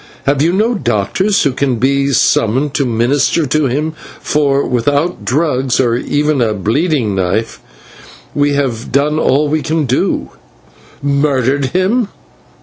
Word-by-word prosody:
Have 140 0 +1
you 165 +3 +3
no 215 +6 +1
doctors 185 - 0
who 140 - +2
can 130 0 -1
be 135 +4 +1
summoned 130 +3 +1
to 140 -3 0
minister 125 +7 +1
to 150 +1 +1
him, 150 +5 -2 0.3
for, 140 -2 +1
without 145 +8 0
drugs, 135 -2 0
or 120 -3 +2
even 145 +2 0
a 110 -2 +1
bleeding 115 - 0
knife, 95 +4 -1 0.7
we 145 0 +1
have 130 -5 -2
done 145 +4 +1
all 150 0 +2
we 155 +1 0
can 160 -1 -1
do." 130 0 -1 0.7
"Murdered 140 -1 +1
him! 190 - 0
140 Hz, 140 wpm, -14 LUFS, 125-150 Hz, 0.7 s, you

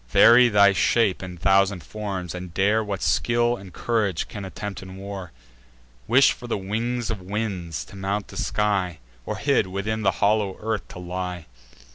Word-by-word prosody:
Vary 120 - +7
thy 100 -2 +5
shape 105 0 +2
in 90 -1 -7
thousand 95 0 +2
forms, 100 -5 -5
and 90 -1 -8
dare 105 +3 +3
What 100 -2 -4
skill 120 +8 +2
and 95 -5 -11
courage 105 -4 -1
can 100 - -7
attempt 100 0 -6
in 95 0 -10
war; 95 -2 -7 0.8
Wish 135 +3 +6
for 120 - -8
the 115 - -1
wings 115 +4 -2
of 105 -4 -4
winds, 95 -4 -4
to - - -14
mount 100 +2 -3
the - - -9
sky; 100 -5 0 0.3
Or - - -2
hid, - - +2
within 100 +4 -3
the 95 -3 +2
hollow 105 -2 +1
earth 110 -1 -3
to - - -11
lie!" 90 -1 -5
100 Hz, 170 wpm, -24 LUFS, 95-110 Hz, 0.8 s, Vary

